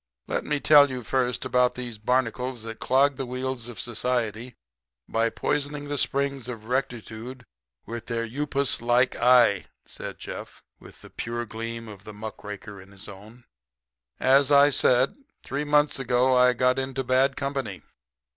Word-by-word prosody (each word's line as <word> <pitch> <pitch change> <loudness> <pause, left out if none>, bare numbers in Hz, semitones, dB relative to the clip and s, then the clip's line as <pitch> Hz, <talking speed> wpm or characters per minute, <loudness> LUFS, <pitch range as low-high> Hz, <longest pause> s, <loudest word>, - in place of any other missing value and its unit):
"Let - - -2
me 150 -1 0
tell 145 +1 +7
you 125 -2 -5
first 125 +1 -1
about 125 0 +2
these 120 -3 -6
barnacles 125 +1 -1
that 115 0 -8
clog 135 +1 +2
the 135 - -3
wheels 125 -1 -4
of 120 - -9
society 120 0 -2 0.5
by 115 +1 +1
poisoning 145 +3 -2
the 145 - -2
springs 140 -2 -1
of 115 -4 -7
rectitude 125 0 -4 0.4
with 115 0 -7
their 115 -1 -2
upas 140 +3 -1
like 120 +2 +2
eye," 120 -5 +4 0.2
said - - -8
Jeff, - - -9 0.2
with - - -15
the - - -13
pure 120 +1 -4
gleam 115 +1 -6
of 100 -2 -11
the 105 - -10
muck 110 +1 -8
raker 105 -1 -8
in 95 - -16
his 100 +2 -11
own. 105 +5 -13 0.8
"As 135 +1 +4
I 145 0 +6
said, 130 0 +3 0.3
three 140 +2 -3
months 150 -1 +3
ago 125 0 +2
I 125 0 +5
got 125 +1 +2
into 135 0 -3
bad 130 +2 +2
company. 140 -3 -4
125 Hz, 160 wpm, -26 LUFS, 115-135 Hz, 0.8 s, tell